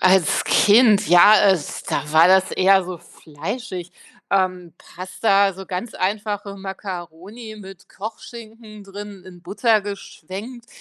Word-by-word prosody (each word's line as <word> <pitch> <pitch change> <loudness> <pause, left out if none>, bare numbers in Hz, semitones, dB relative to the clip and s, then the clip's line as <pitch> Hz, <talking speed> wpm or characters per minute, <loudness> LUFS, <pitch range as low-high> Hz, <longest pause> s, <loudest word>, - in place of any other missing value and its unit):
Als 185 -3 +3
Kind, 210 -2 +4
ja, 175 +5 +7 0.2
es 170 -6 -3
da 150 +1 -3
war 160 +2 +6
das 190 +1 +3
eher 190 0 +3
so 180 0 -7
fleischig, 180 - -8 0.4
ähm, 185 -3 -1
Pasta, 195 +2 0
so 190 +1 -10
ganz 190 +5 -5
einfache 205 +1 -3
Makkaroni 195 +3 -9
mit 195 -3 -13
Kochschinken 220 0 -10
drin 200 -1 -10
in 180 -2 -14
Butter 215 +4 +1
geschwenkt. 205 +4 -9
195 Hz, 120 wpm, -21 LUFS, 180-210 Hz, 0.4 s, ja